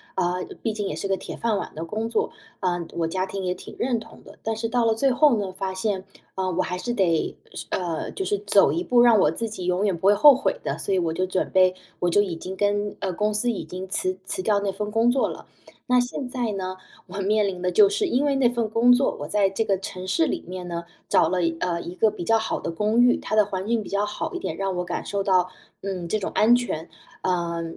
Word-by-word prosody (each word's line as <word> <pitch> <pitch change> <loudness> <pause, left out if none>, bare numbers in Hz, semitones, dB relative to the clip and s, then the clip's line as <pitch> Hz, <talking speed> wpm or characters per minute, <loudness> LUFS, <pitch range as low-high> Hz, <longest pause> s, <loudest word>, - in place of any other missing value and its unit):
呃， 180 0 0 0.2
毕 225 - 0
竟 210 -2 -3
也 - - -3
是 - - -3
个 195 - +1
铁 - - -8
饭 225 -3 0
碗 - - -7
的 160 +2 -4
工 220 +6 -3
作， 435 - 0 0.3
呃， 175 -2 0
我 165 -1 +1
家 185 +3 -2
庭 195 0 -5
也 180 - 0
挺 180 - -11
认 240 -1 0
同 220 - -14
的。 - - -15
但 225 0 -2
是 230 +1 -2
到 240 +1 +1
了 225 -1 +3
最 270 +4 +3
后 275 -1 +4
呢， 195 -3 -3
发 190 -1 -3
现， 190 -1 -2 0.3
呃， 185 -1 -1
我 185 - +1
还 180 - -3
是 210 +7 -3
得， 180 -8 +1 0.2
是 - - -7
呃， 170 -3 -2
就 385 - -4
是 410 +1 0
走 - - +4
一 345 - -1
步， 245 -8 +3
让 235 -3 +6
我 150 - +4
自 225 +9 -2
己 210 -5 -6
永 180 +3 +1
远 195 -3 +1
不 170 +3 0
会 205 - +6
后 290 +7 +9
悔 270 - -1
的， - - -2
所 - - -2
以 - - +2
我 170 -3 0
就 185 +3 -1
准 185 0 -1
备， 185 -1 +4 0.2
我 175 - +1
就 205 +4 +4
已 185 -4 -4
经 185 +3 -7
跟， 205 +1 0
呃， 190 -2 -2
公 210 +4 0
司 215 +4 +1
已 220 - -4
经 185 +1 -7
辞 185 0 0
辞 185 - -2
掉 205 +1 +2
那 200 -1 -1
份 210 +2 -4
工 225 +3 +3
作 260 +1 +1
了。 - - -8 0.4
那 250 0 +4
现 245 +2 -2
在 245 -3 -2
呢， 185 -1 -4 0.3
我 195 +2 -7
面 210 +1 +2
临 185 -2 -4
的 180 0 0
就 415 - +7
是 410 0 0
因 280 -3 +1
为 285 -1 +2
那 255 -3 +4
份 235 -2 -1
工 235 +2 +5
作， 250 +2 +3
我 145 - -5
在 195 +2 +2
这 210 +4 0
个 195 -3 +1
城 185 0 -7
市 185 -3 +2
里 - - -2
面 180 0 -6
呢， 170 -1 -4 0.2
找 160 - +4
了 180 0 0
一 165 0 0
呃， 175 -2 -1
一 170 - -7
个 220 +4 +3
比 175 - -6
较 225 +5 +3
好 220 - -2
的 - - -4
公 210 +7 +1
寓， 245 0 +5
它 - - -3
的 215 -1 +5
环 190 -1 -4
境 230 -1 +1
比 - - -10
较 200 +1 0
好 210 +10 -4
一 360 - -3
点， - - -4
让 195 -1 -1
我 180 - 0
感 180 - -4
受 200 -1 -2
到， 185 -2 +3 0.3
嗯， 185 -3 -4
这 215 - +1
种 195 - -3
安 225 +3 +5
全， 175 -9 -4 0.3
呃， 170 -2 -1
200 Hz, 290 characters per minute, -24 LUFS, 185-230 Hz, 0.4 s, 后